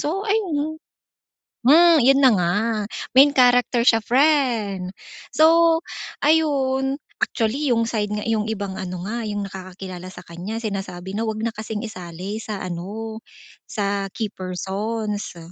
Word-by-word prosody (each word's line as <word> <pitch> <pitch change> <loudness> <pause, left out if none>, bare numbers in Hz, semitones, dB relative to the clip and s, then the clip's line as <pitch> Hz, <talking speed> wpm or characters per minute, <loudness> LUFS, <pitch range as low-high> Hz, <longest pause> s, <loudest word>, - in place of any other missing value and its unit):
So 350 +7 -2
ayun 315 -8 -1 0.8
hmm, 320 +5 +6
'yon 270 +3 +5
na 265 - +7
nga, 175 -3 +1 0.6
main 270 +3 +8
character 245 -1 +4
siya, 225 -2 +5
friend. 235 -8 +2 0.4
So, 330 +1 +5 0.5
ayun, 275 -3 +2 0.2
actually, 260 +6 0
yung 230 -2 +2
side 215 -3 -2
nga 210 0 -3
yung 220 -1 0
ibang 200 -3 -3
ano 180 -1 -5
nga, 235 +4 -3
yung 205 -1 -3
nakakakilala 185 -1 -8
sa 185 - -12
kanya 180 +6 -6
sinasabi 195 -4 -5
na 215 - -2
huwag 220 0 -2
na 230 - -2
kasing 220 +1 -5
isali 190 +1 -6
sa 210 -4 -5
ano, 210 +6 -6 0.5
sa 200 -2 -2
key 215 +1 -4
persons. 205 +2 -4
220 Hz, 135 wpm, -22 LUFS, 195-265 Hz, 0.8 s, main